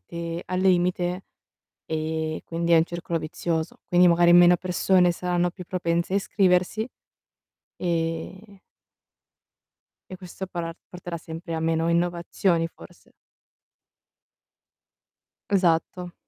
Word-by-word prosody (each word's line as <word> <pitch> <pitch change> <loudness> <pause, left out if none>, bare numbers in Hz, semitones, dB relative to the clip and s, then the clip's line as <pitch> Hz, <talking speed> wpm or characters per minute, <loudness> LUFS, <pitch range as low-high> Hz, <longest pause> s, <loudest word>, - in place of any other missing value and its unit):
mente 170 0 -4
al 185 0 -2
limite, 180 0 +1 0.6
ehm, 160 0 -3
quindi 170 0 -2
è - - +7
un 160 - +5
circolo 170 -1 -4
vizioso. 160 0 -3
Quindi 180 0 +5
magari 175 0 +5
meno 175 0 +7
persone 180 0 +2
saranno 175 0 -1
più 180 0 -10
propense 170 0 -1
a - - +3
iscriversi 195 +3 +1 0.9
e 175 +4 -3 1.5
e 185 - -7
questo 185 +1 -8
parà 170 -2 -5 0.2
porterà 175 -1 -7
sempre 165 +1 -7
a 160 - -2
meno 165 0 0
innovazioni, 170 0 0
forse. - - -17 2.4
Esatto. 180 -1 +1
175 Hz, 105 wpm, -25 LUFS, 165-180 Hz, 2.4 s, è